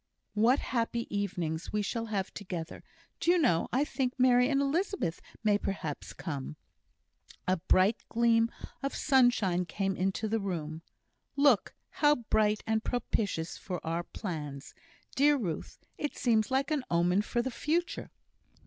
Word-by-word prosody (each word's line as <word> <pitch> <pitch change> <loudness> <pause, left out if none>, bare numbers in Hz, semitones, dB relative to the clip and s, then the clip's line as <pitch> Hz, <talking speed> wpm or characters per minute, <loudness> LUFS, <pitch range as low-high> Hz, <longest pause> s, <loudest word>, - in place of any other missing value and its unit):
"What 230 +5 +4
happy 235 -2 -1
evenings 175 -5 -2
we 210 0 0
shall 230 +2 -2
have 200 -3 -2
together! 180 -5 -6 0.4
Do - - 0
you 360 - +6
know, 240 - +3
I 270 +4 +2
think 260 -3 -2
Mary 250 0 +5
and 275 -1 +2
Elizabeth 280 - 0 0.2
may 205 -1 +3
perhaps 160 -8 -4
come." 145 -3 -5 0.9
A 185 +1 +3
bright 185 +5 +3
gleam 230 0 +3 0.3
of 275 +1 -2
sunshine 245 -10 +3
came 195 +2 -2
into 190 +4 -1
the 225 +1 0
room. 165 -5 -4 0.5
"Look! 280 -7 +3 0.3
how 295 -1 +6
bright 215 -3 +1
and 220 0 0
propitious 200 -8 -1
for 180 -3 -5
our 165 +1 -1
plans. 150 -8 -6 0.4
Dear 290 +1 +5
Ruth, 180 - -4 0.2
it 295 - -3
seems 225 -5 +2
like 270 +3 +1
an 295 -4 +1
omen 175 +3 +3
for 240 +3 -1
the 260 - -3
future!" 335 +8 -1
215 Hz, 145 wpm, -30 LUFS, 180-255 Hz, 0.9 s, you